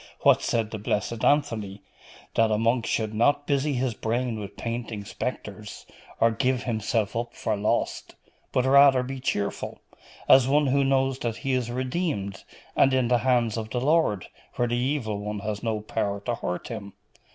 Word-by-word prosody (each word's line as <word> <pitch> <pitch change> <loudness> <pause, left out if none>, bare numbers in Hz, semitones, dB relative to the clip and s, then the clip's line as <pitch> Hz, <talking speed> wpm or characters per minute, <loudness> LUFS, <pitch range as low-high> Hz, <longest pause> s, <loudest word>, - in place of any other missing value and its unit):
What - - +5
said 115 -2 -1
the 110 - -5
blessed 105 +2 -2
Anthony? 110 -9 +1 0.5
That 115 -1 +3
a 105 - +2
monk 115 +1 +1
should 110 -1 -1
not 145 +6 +2
busy 140 +1 +1
his 125 -2 0
brain 115 +1 -2
with 100 -2 -8
painting 115 -3 -4
spectres, 105 -3 -6 0.3
or 115 0 +4
give 125 +2 0
himself 110 -2 -1
up 120 +1 -3
for 110 - -1
lost; 105 +1 -1 0.4
but 130 - +1
rather 135 -1 +6
be 135 +1 -5
cheerful, 105 -5 -2 0.5
as 130 -1 +7
one 145 +2 +3
who 140 +1 +2
knows 135 -1 +1
that 115 -2 -2
he 135 - +1
is 125 -2 0
redeemed, 125 - -2 0.3
and 135 -1 +4
in 125 -2 +2
the 120 -1 +4
hands 120 -3 +1
of 110 -1 -4
the 120 - -2
Lord, 135 - +2 0.3
where 120 - +1
the 120 - 0
Evil 120 -5 -1
One 105 +1 -4
has 105 0 -3
no 110 -2 -1
power 100 -1 -2
to 120 +3 -2
hurt 90 -6 -4
him. 105 -4 -7
120 Hz, 175 wpm, -26 LUFS, 110-130 Hz, 0.5 s, as